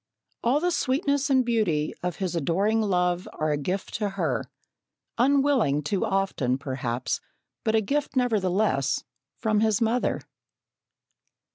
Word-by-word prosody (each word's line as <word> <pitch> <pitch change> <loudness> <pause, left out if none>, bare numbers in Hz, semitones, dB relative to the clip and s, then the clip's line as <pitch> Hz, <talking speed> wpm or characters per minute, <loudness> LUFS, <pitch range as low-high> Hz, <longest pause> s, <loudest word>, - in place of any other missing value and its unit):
All 250 +5 +3
the 355 +3 +1
sweetness 280 -2 +1
and 260 -2 +4
beauty 195 -11 +1
of 180 -2 -2
his 185 -3 -3
adoring 195 +8 +1
love 180 -3 +1
are 155 0 -1
a - - +2
gift 180 +7 -3
to 210 -2 0
her, 165 - -2 0.7
unwilling 265 - +3
too 195 +8 0
often, 190 - 0
perhaps, 130 -3 -3 0.4
but 220 -1 +1
a 220 - +4
gift 285 +8 -1
nevertheless, 200 - +1 0.3
from 215 -2 +1
his 220 -2 +2
mother. 230 +2 +1
200 Hz, 130 wpm, -26 LUFS, 165-240 Hz, 0.7 s, and